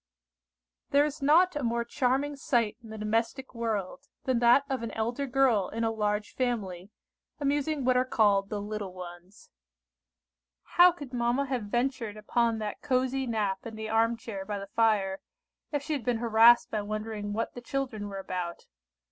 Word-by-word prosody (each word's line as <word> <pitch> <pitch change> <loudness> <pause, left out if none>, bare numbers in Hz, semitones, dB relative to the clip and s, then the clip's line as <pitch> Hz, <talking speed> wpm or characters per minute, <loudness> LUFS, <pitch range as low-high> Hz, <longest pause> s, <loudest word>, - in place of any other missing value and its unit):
THERE 285 +1 +4
is 300 0 -5
not 325 +5 +4
a 295 - -2
more 235 -1 0
charming 270 +3 0
sight 235 -6 0
in 225 - -13
the 220 - -7
domestic 225 +5 -1
world, 230 +3 -3 0.2
than 255 -3 +1
that 240 +3 +5
of 265 -4 -2
an 230 - -3
elder 240 +5 -2
girl 245 -7 +2
in 230 +1 -3
a 225 - +1
large 210 -1 -1
family, 205 -8 -2 0.5
amusing 290 0 0
what 255 0 +3
are 250 - +4
called 205 -5 +2
the 210 - -3
little 205 -2 -5
ones. 180 +1 -11 1.1
How 355 +1 +6
could 285 -7 -10
mamma 240 +3 +1
have 255 -5 -2
ventured 240 -1 -2
upon 230 +2 +1
that 215 -1 -5
cosy 260 -1 0
nap 210 -4 -1
in 225 -1 -7
the 220 0 -5
arm 225 +1 +2
chair 210 -4 -6
by 205 +1 -4
the 200 0 -8
fire, 205 -4 +2 0.5
if 290 -2 -1
she 315 - -2
had 280 -5 -2
been 240 0 0
harassed 230 +1 +5
by 215 - -1
wondering 215 0 -4
what 225 +2 -2
the 245 - -8
children 240 -5 -3
were 200 -1 -6
about? 180 -3 -5
230 Hz, 175 wpm, -29 LUFS, 210-260 Hz, 1.1 s, How